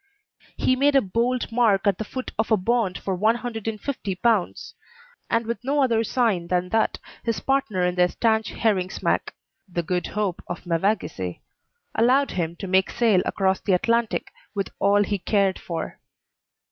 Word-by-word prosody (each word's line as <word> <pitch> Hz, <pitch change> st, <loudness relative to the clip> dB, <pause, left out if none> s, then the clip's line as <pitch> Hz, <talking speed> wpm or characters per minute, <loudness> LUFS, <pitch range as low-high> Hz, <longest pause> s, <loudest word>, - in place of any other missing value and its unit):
He 255 Hz, -, +2 dB
made 280 Hz, +2 st, +3 dB
a -, -, +8 dB
bold 235 Hz, +5 st, -1 dB
mark 225 Hz, -4 st, +3 dB
at 200 Hz, -3 st, +2 dB
the -, -, -1 dB
foot 255 Hz, +4 st, -6 dB
of 220 Hz, -, +1 dB
a 220 Hz, -, +5 dB
bond 205 Hz, -1 st, 0 dB
for 195 Hz, -, -3 dB
150 225 Hz, +1 st, -2 dB
pounds; 220 Hz, -1 st, 0 dB, 0.6 s
and 230 Hz, 0 st, +1 dB
with 235 Hz, +2 st, -4 dB
no 280 Hz, +2 st, +2 dB
other 230 Hz, -3 st, +2 dB
sign 220 Hz, -7 st, +1 dB
than 180 Hz, 0 st, 0 dB
that, 220 Hz, +3 st, +1 dB, 0.2 s
his 230 Hz, -1 st, -1 dB
partner 265 Hz, -9 st, 0 dB
in 180 Hz, -, +1 dB
their 180 Hz, 0 st, +4 dB
stanch 220 Hz, +3 st, +1 dB
herring 195 Hz, -5 st, 0 dB
smack -, -, -1 dB, 0.4 s
(the 175 Hz, -1 st, -1 dB
Good 180 Hz, +2 st, -1 dB
Hope, 205 Hz, -4 st, -2 dB
of 175 Hz, -, -6 dB
Mevagissey) 165 Hz, -, -1 dB, 0.5 s
allowed 260 Hz, +5 st, +3 dB
him 170 Hz, -2 st, -2 dB
to 190 Hz, -, -6 dB
make 190 Hz, +1 st, +3 dB
sail 225 Hz, -6 st, +3 dB
across 190 Hz, -1 st, +1 dB
the 195 Hz, -, 0 dB
Atlantic 230 Hz, +5 st, +1 dB, 0.2 s
with 195 Hz, -1 st, -2 dB
all 205 Hz, +1 st, +4 dB
he 200 Hz, 0 st, -2 dB
cared 195 Hz, -1 st, +1 dB
for. 165 Hz, -2 st, -5 dB
210 Hz, 165 wpm, -24 LUFS, 185-235 Hz, 0.6 s, a